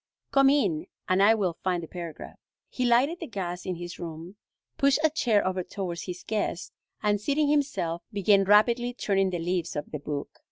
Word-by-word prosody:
Come 275 Hz, -1 st, +5 dB
in 190 Hz, -, +1 dB, 0.2 s
and 185 Hz, +1 st, +3 dB
I 215 Hz, +3 st, +6 dB
will 185 Hz, -6 st, -1 dB
find 180 Hz, -2 st, 0 dB
the -, -, -7 dB
paragraph." 170 Hz, -2 st, -8 dB, 0.3 s
He 250 Hz, -, -2 dB
lighted 260 Hz, +8 st, +3 dB
the -, -, -6 dB
gas 180 Hz, -5 st, -5 dB
in 185 Hz, -, -1 dB
his 175 Hz, +1 st, -8 dB
room, 170 Hz, +2 st, -7 dB, 0.4 s
pushed 275 Hz, 0 st, +3 dB
a 315 Hz, -, +4 dB
chair 230 Hz, -9 st, +2 dB
over 185 Hz, 0 st, 0 dB
towards 175 Hz, -2 st, -5 dB
his 180 Hz, -1 st, -7 dB
guest, 210 Hz, -5 st, -2 dB, 0.3 s
and, 205 Hz, -1 st, +2 dB
seating 285 Hz, +6 st, +1 dB
himself, 270 Hz, -, 0 dB
began 200 Hz, -1 st, +3 dB
rapidly 235 Hz, +4 st, +4 dB
turning 195 Hz, -5 st, +1 dB
the 180 Hz, -, -2 dB
leaves 175 Hz, 0 st, -2 dB
of 150 Hz, -, -5 dB
the 150 Hz, -, -4 dB
book. 145 Hz, 0 st, -5 dB
195 Hz, 190 wpm, -27 LUFS, 175-235 Hz, 0.4 s, I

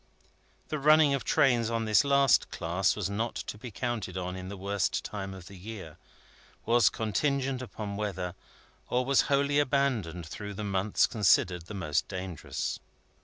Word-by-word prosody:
The 155 Hz, -, -2 dB
running 150 Hz, 0 st, +5 dB
of 140 Hz, -, -1 dB
trains 120 Hz, -5 st, +3 dB
on 115 Hz, -1 st, -1 dB
this 110 Hz, +4 st, +4 dB
last 140 Hz, -2 st, +4 dB
class 85 Hz, +2 st, 0 dB
was 105 Hz, -3 st, -2 dB
not 110 Hz, +4 st, -2 dB
to -, -, -5 dB
be 115 Hz, +4 st, -8 dB
counted 110 Hz, -4 st, -3 dB
on 90 Hz, 0 st, -3 dB
in 95 Hz, 0 st, -7 dB
the 100 Hz, -, -7 dB
worst 100 Hz, 0 st, -1 dB
time 95 Hz, -2 st, -5 dB
of 95 Hz, -2 st, -10 dB
the 100 Hz, -, -11 dB
year, 95 Hz, -4 st, -9 dB, 0.7 s
was 120 Hz, 0 st, +5 dB
contingent 130 Hz, +4 st, -1 dB
upon 105 Hz, -5 st, -6 dB
weather, 95 Hz, -4 st, -3 dB, 0.6 s
or 125 Hz, +1 st, +1 dB
was 135 Hz, 0 st, +4 dB
wholly 140 Hz, +1 st, +3 dB
abandoned 125 Hz, -, 0 dB
through 100 Hz, +6 st, -7 dB
the 105 Hz, -, -5 dB
months 100 Hz, 0 st, +2 dB
considered 90 Hz, -5 st, +2 dB
the 105 Hz, -, -7 dB
most 75 Hz, -6 st, -1 dB
dangerous. 95 Hz, -4 st, -4 dB
105 Hz, 165 wpm, -29 LUFS, 95-125 Hz, 0.7 s, running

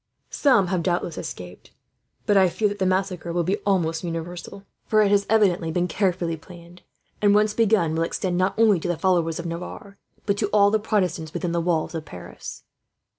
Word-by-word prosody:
"Some 255 Hz, -9 st, +3 dB
have 180 Hz, -2 st, 0 dB
doubtless 175 Hz, -1 st, -1 dB
escaped; 90 Hz, 0 st, -9 dB, 0.5 s
but 205 Hz, -, +2 dB
I 190 Hz, -2 st, +5 dB
fear 210 Hz, +5 st, 0 dB
that 205 Hz, 0 st, -6 dB
the 190 Hz, -, +1 dB
massacre 185 Hz, -2 st, -1 dB
will 175 Hz, 0 st, 0 dB
be 190 Hz, +5 st, 0 dB
almost 170 Hz, -6 st, 0 dB
universal, 175 Hz, +3 st, -6 dB, 0.2 s
for 215 Hz, -1 st, +4 dB
it 200 Hz, -, +2 dB
has 200 Hz, -1 st, +2 dB
evidently 190 Hz, -6 st, +3 dB
been 175 Hz, +2 st, 0 dB
carefully 180 Hz, -2 st, -1 dB
planned 175 Hz, +2 st, -14 dB, 0.4 s
and, 205 Hz, -1 st, +4 dB
once 210 Hz, 0 st, +3 dB
begun, 215 Hz, -8 st, +2 dB
will 160 Hz, -, -1 dB
extend 175 Hz, +2 st, -1 dB
not 185 Hz, +3 st, 0 dB
only 215 Hz, -5 st, +4 dB
to 165 Hz, -, -4 dB
the 175 Hz, -2 st, -1 dB
followers 165 Hz, -2 st, +1 dB
of 170 Hz, -, -6 dB
Navarre, 180 Hz, +4 st, -7 dB, 0.3 s
but 200 Hz, -1 st, 0 dB
to 210 Hz, -, +1 dB
all 205 Hz, 0 st, +4 dB
the 220 Hz, -, +2 dB
Protestants 180 Hz, -7 st, -1 dB
within 175 Hz, -, -2 dB
the 170 Hz, 0 st, 0 dB
walls 165 Hz, -1 st, -1 dB
of 160 Hz, -2 st, -4 dB
Paris." 90 Hz, -, -10 dB
180 Hz, 195 wpm, -24 LUFS, 170-200 Hz, 0.5 s, I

